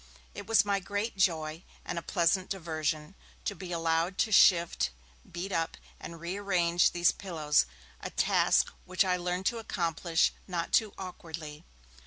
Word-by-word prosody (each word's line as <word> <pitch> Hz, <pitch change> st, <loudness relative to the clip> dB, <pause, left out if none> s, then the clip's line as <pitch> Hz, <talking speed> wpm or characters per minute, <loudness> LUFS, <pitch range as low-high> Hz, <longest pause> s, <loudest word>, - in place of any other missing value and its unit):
It 205 Hz, 0 st, -8 dB
was 220 Hz, -1 st, +4 dB
my 200 Hz, -1 st, +1 dB
great 205 Hz, +4 st, -3 dB
joy, 165 Hz, -3 st, 0 dB, 0.2 s
and 170 Hz, -, -3 dB
a -, -, -9 dB
pleasant 180 Hz, +2 st, +1 dB
diversion, 155 Hz, -3 st, -3 dB, 0.3 s
to -, -, -1 dB
be 185 Hz, -2 st, -8 dB
allowed 165 Hz, +2 st, 0 dB
to 220 Hz, -, -9 dB
shift, 170 Hz, -, +5 dB, 0.4 s
beat 175 Hz, +3 st, -5 dB
up, 165 Hz, -2 st, -1 dB, 0.2 s
and 170 Hz, 0 st, -9 dB
rearrange 175 Hz, -1 st, +1 dB
these 175 Hz, 0 st, +3 dB
pillows, 155 Hz, -, +1 dB, 0.3 s
a -, -, -4 dB
task -, -, +2 dB
which 185 Hz, +1 st, +2 dB
I 180 Hz, -1 st, +2 dB
learned 180 Hz, +1 st, -3 dB
to 235 Hz, +2 st, +1 dB
accomplish 170 Hz, -5 st, 0 dB
not 170 Hz, -3 st, -3 dB
too 215 Hz, -3 st, +3 dB
awkwardly. 165 Hz, -4 st, -8 dB
175 Hz, 150 wpm, -30 LUFS, 165-195 Hz, 0.4 s, shift